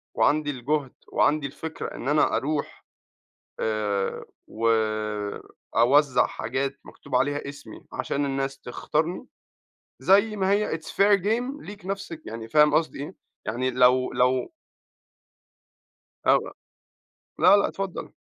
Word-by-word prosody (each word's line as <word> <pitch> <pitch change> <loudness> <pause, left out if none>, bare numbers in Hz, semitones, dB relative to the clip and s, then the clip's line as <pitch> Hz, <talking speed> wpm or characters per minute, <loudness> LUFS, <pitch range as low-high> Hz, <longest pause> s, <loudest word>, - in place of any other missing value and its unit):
وعندي 150 0 +2
الجهد 135 +1 -2 0.2
وعندي 145 -1 +2
الفكرة 160 +3 -6
إن 120 - -6
أنا 150 +1 +3
أروح 150 +1 -3 0.7
آآ 105 -3 -1 0.2
وأوزع 110 +4 +1
حاجات 135 +4 -3
مكتوب - - -7
عليها 145 +2 0
إسمي، 145 0 -11
عشان 140 +1 -1
الناس 135 0 -2
تختارني، 155 - -2 0.8
زي 205 +3 +4
ما 190 -1 +1
هي 205 -4 +1
it's 160 - -16
fair 200 0 +3
game 245 +7 -1
ليك 205 -2 -10
نفس 195 -3 -4
يعني 115 0 -7
فاهم 150 +3 +5
قصدي 155 +1 +1
إيه؟ 165 +6 -7 0.3
يعني 125 +4 -1
لو 125 0 +4
لو 125 - +1 1.8
أو - - +6 1.0
لا 200 - +7
لأ، 200 - +2
اتفضل. 195 -2 -5
145 Hz, 115 wpm, -25 LUFS, 125-170 Hz, 1.8 s, لا